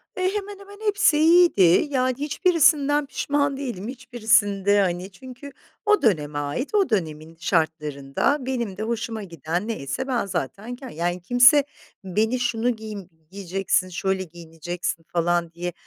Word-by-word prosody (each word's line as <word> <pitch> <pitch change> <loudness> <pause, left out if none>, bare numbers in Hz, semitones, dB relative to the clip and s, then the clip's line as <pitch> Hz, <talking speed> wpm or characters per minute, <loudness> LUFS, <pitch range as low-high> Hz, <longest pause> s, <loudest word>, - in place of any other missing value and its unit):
E, 370 - -4
hemen 405 -1 -5
hemen 400 +1 -13
hepsi 410 -7 +3
iyiydi. 335 - +5 0.3
Yani, 255 -2 +1
hiçbirisinden 295 -2 +2
pişman 285 0 -1
değilim, 235 -7 -5
hiçbirisinde, 220 -6 +2
hani 180 +1 -2
Çünkü 260 +7 -11 0.3
o 420 0 +4
döneme 150 -9 +1
ait, 145 - -3
o 395 -3 +3
dönemin 160 -5 -3
şartlarında 155 - 0
benim 235 -7 -3
de 215 - -3
hoşuma 225 -1 -3
giden 170 +2 -4
neyse 230 - -4
ben 240 -5 0
zaten 195 - -4
k 260 0 -10
Yani, 175 +2 -2
kimse 245 - +6 0.4
beni, 220 +6 0
"Şunu 240 0 0
giym 215 -4 -8 0.2
giyeceksin, 195 -1 -1
şöyle 190 +2 -2
giyineceksin." 170 +1 -6
falan 175 0 0
diye, 175 +1 -5
215 Hz, 135 wpm, -23 LUFS, 175-265 Hz, 0.4 s, kimse